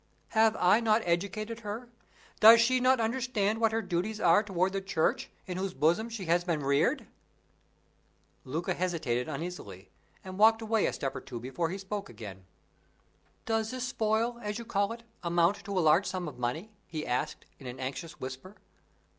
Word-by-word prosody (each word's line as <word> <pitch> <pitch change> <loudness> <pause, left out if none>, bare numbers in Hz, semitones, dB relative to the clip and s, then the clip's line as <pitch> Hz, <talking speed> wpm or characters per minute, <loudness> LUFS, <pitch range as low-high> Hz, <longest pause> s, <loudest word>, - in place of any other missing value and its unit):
"Have 220 -1 +4
I 180 +5 +4
not 225 -1 +2
educated 200 +6 -1
her? 225 +2 -6 0.5
Does 225 +2 +9
she 255 +2 +4
not 255 0 +4
understand 225 -2 0
what 225 -1 +4
her 225 0 -1
duties 195 +4 -2
are 175 +2 +5
toward 190 -2 0
the 195 - -1
Church, 190 -5 0 0.2
in 180 -1 -5
whose 190 -1 -3
bosom 175 +9 +2
she 225 -5 -6
has 170 +1 +2
been 165 -5 -1
reared?" 140 +1 +2 1.4
Luca 160 +6 -2
hesitated 155 -10 -1
uneasily, 135 - -7 0.3
and 185 +1 -8
walked 225 +1 +5
away 220 -1 +2
a - - -2
step 135 - -3
or - - -5
two 125 -3 -7
before 135 +8 -2
he 190 - -4
spoke 200 +1 -5
again. 95 -4 -10 1.0
"Does 225 -1 0
this 250 0 -3
spoil, 230 +1 0
as 210 -1 -3
you 235 - -7
call 205 -2 0
it, 230 0 -8 0.2
amount 170 +2 +2
to 200 -1 -3
a - - +4
large 160 +4 +4
sum 185 -2 -3
of 150 - -8
money?" 155 - -3 0.2
he 155 -2 -5
asked, 125 +5 -2
in 135 - -9
an 125 +1 -7
anxious 145 +5 -5
whisper. 130 +10 -7
190 Hz, 180 wpm, -30 LUFS, 160-220 Hz, 1.4 s, Does